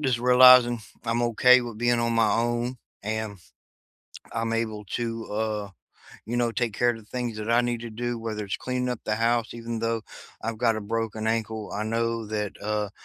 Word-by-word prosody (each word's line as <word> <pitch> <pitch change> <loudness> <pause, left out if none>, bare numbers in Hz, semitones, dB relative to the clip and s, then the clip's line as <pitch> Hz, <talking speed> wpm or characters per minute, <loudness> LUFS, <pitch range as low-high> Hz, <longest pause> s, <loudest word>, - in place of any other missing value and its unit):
just 130 -5 +1
realizing 125 -1 +7 0.2
I'm 115 +1 0
okay 125 +2 +5
with 120 -3 -7
being 120 0 +2
on 115 0 +1
my 115 - +3
own, 120 +2 0 0.3
and 110 -1 -3 0.9
I'm 115 0 -2
able 110 -2 -2
to, 115 -1 -3
uh, 105 -1 -2 0.6
you 120 - -2
know, 120 -1 +1
take 115 -3 -1
care 120 +3 +3
of 115 - -4
the - - -14
things 120 -1 -4
that 110 +1 -3
I 120 +1 +5
need 120 -1 -1
to 120 - -6
do, 120 +1 -3
whether 110 -2 -4
it's 100 - -3
cleaning 125 0 -2
up 125 - -4
the 110 - 0
house, 115 +1 +1
even 115 0 -5
though 115 0 -1 0.4
I've 115 -1 -3
got 115 -2 +2
a - - -3
broken 110 0 -3
ankle, 110 -1 -2
I 105 +1 -2
know 115 0 -1
that, 105 -1 -3
uh, 105 -1 -1
115 Hz, 200 wpm, -26 LUFS, 110-120 Hz, 0.9 s, realizing